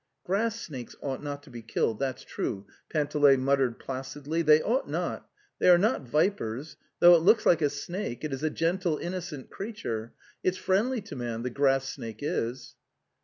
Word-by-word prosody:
'' - - -54
Grass 225 +5 0
snakes 130 - -8
ought 135 -2 -3
not 145 -1 -5
to 140 - -15
be 120 -1 -8
killed, 110 -1 -1
that's 130 -2 -2
true," 100 0 -4 0.2
Panteley 145 -2 +4
muttered 130 -2 +1
placidly, 140 +4 -4
"they 155 -1 +6
ought 250 +5 0
not.... - - -3 0.3
They - - +5
are 175 - +9
not 195 - +1
vipers; 150 - 0 0.2
though 175 0 +8
it 170 - +6
looks 215 +6 +4
like 170 - +5
a 145 - +3
snake, 145 -1 -5
it 150 -3 -2
is 135 - -4
a 155 - +1
gentle, 170 +1 0
innocent 175 -6 -5
creature.... 120 - -5 0.3
It's 185 0 0
friendly 220 +6 +1
to 205 - -9
man, 120 -2 -4
the 125 - -2
grass 135 0 +2
snake 110 -4 -7
is." 125 -1 -2
145 Hz, 180 wpm, -28 LUFS, 130-180 Hz, 0.3 s, are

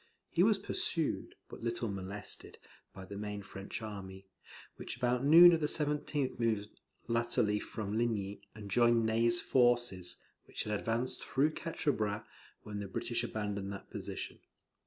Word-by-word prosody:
He 170 - +2
was 210 +2 +5
pursued, 165 -5 -1
but - - -10
little 115 0 -1
molested, 100 0 -5 0.3
by 95 0 -10
the 100 - -8
main 105 -1 -4
French 95 +4 -7
army, 95 -2 -7 0.5
which - - -6
about 125 0 +1
noon 170 +4 +10
of 165 - +2
the 150 - +1
17th 150 -3 0
moved 110 -3 0 0.4
laterally 115 -2 +1
from 105 -1 -4
Ligny, 105 -4 -1
and 105 -2 -8
joined 120 0 +4
Ney's 115 +1 +3
forces, 120 -8 +2 0.3
which - - -4
had 105 -1 -1
advanced 115 +3 -2
through 145 +4 +2
Quatre 160 -3 -1
Bras 105 -3 -2 0.4
when 105 -1 -5
the 100 - -4
British 95 - -1
abandoned 100 -2 -3
that 100 - -10
position. - - -5
115 Hz, 150 wpm, -33 LUFS, 100-125 Hz, 0.5 s, noon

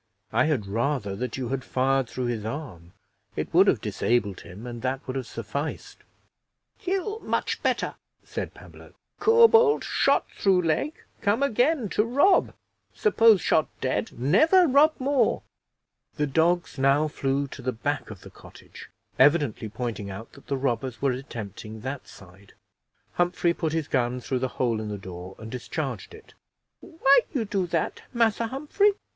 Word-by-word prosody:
I - - +3
had 145 -10 0
rather 115 0 -1
that 125 +4 -4
you 125 -3 -3
had 135 -1 -2
fired 130 -1 +1
through 130 - -3
his 120 -3 -2
arm 110 - -7 0.4
it - - -4
would - - +6
have - - +3
disabled 105 -6 0
him, 100 +7 -11
and 120 -1 -7
that 130 +1 -2
would 130 - -5
have 130 -3 -3
sufficed." - - -5 0.8
"Kill 390 +4 -2
much - - -2
better," - - 0 0.3
said - - -6
Pablo. - - -15 0.2
"Corbould 455 0 +6
shot - - +2
through 190 -2 +3
leg, 165 - 0 0.3
come 210 +6 +2
again 260 0 +2
to 210 - +2
rob; 285 - +3 0.4
suppose 230 - +5
shot 155 - +2
dead, 110 -5 -1
never 315 - +5
rob 290 +3 +5
more." 275 0 +1 0.7
The 150 - 0
dogs 160 +2 +1
now 140 +3 +3
flew 140 -1 -1
to 135 - -9
the 130 0 -1
back 145 +5 -3
of 105 -4 -10
the - - -13
cottage, - - -14 0.3
evidently 140 -6 +3
pointing 110 -2 -4
out 100 +4 -8
that 140 - -17
the 140 - -1
robbers 130 -2 -2
were 135 -1 +1
attempting 110 -4 -7
that 135 +3 -5
side. 95 +1 -16 0.6
Humphrey 175 -1 +1
put 160 -2 -2
his 160 -2 -1
gun 125 -3 0
through 125 +1 -2
the 130 - 0
hole 115 -3 +1
in 110 - -5
the 105 - -4
door, 95 -1 -9
and 110 0 -9
discharged 135 - -5
it. 440 - -17 0.5
"Why 280 -5 +4 0.2
you 235 -5 0
do 195 -3 -1
that, 165 -2 -2
Massa 230 -1 +2
Humphrey? 300 - +1
140 Hz, 160 wpm, -26 LUFS, -, 0.8 s, would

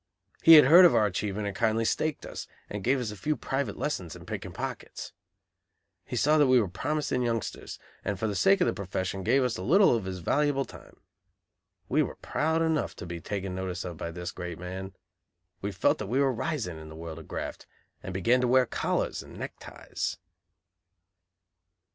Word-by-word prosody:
He 165 - +9
had 150 -4 +10
heard 170 +7 +9
of 175 - +7
our 105 - +4
achievement 105 +1 -2
and 100 -1 -3
kindly 110 +2 +1
"staked" 155 +6 -1
us, - - -7 0.2
and 105 -1 -4
gave 130 +2 +2
us 115 -4 -3
a - - -7
few 150 +10 -1
private 135 -6 -2
lessons 90 - -3
in - - -12
picking - - -5
pockets. - - -6 0.9
He - - -4
saw 155 +2 +3
that 145 - +5
we 130 -1 +6
were 105 - +1
promising 130 - -1
youngsters, 115 -4 -3 0.3
and 100 - -2
for 110 - -2
the 105 - -1
sake 195 - +4
of - - +5
the - - +1
profession 95 0 -3
gave 130 +7 +3
us 125 -2 -1
a - - -5
little 175 - +5
of 110 -5 -3
his 95 -1 -4
valuable 140 - +1
time. - - -14 0.9
We - - +2
were - - -2
proud 160 +2 0
enough, 160 -2 0
to - - -8
be 85 -1 -6
taken 95 -1 -4
notice 95 -1 -4
of 85 -3 -6
by 85 - -4
this 90 +1 -5
great 90 -2 -6
man. 95 +2 -7 0.7
We 100 - -2
felt 95 - +2
that 105 - -4
we 125 +6 0
were 135 -2 +3
rising 115 - -3
in 80 0 -10
the 80 - -10
world 80 0 -7
of 80 - -12
graft, - - -6 0.3
and - - -6
began 115 +8 +2
to 125 - +2
wear 130 +1 +5
collars - - -1
and - - -12
neckties. - - -5
110 Hz, 200 wpm, -28 LUFS, 95-140 Hz, 0.9 s, had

